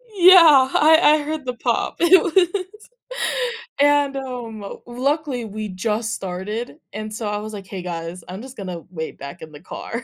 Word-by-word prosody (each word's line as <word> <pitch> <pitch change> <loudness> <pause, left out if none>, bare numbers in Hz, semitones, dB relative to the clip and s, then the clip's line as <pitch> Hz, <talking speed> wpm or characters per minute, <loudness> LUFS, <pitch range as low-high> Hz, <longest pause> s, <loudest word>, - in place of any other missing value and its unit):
Yeah, 335 -8 +8
I 315 +1 +6 0.2
I 305 - -2
heard 305 -1 -4
the 250 - -2
pop. 240 - -1
It 345 +1 +6
was 360 +2 +2 1.2
and, 285 -1 +3
um, 235 -6 -7
luckily 265 0 -2
we 215 0 -6
just 215 +4 -2
started, 200 +8 -5 0.2
and 215 0 -6
so 215 0 -4
I 205 - -2
was 215 +1 -7
like, 195 -2 -8
"Hey 195 -2 -6
guys, 170 0 -6
I'm 185 +3 -7
just 260 +1 -11
gonna 180 -5 -6
wait 160 -3 -6
back 140 +5 -9
in 160 - -11
the 145 - -12
car," 230 +5 -7
230 Hz, 175 wpm, -21 LUFS, 195-290 Hz, 1.2 s, Yeah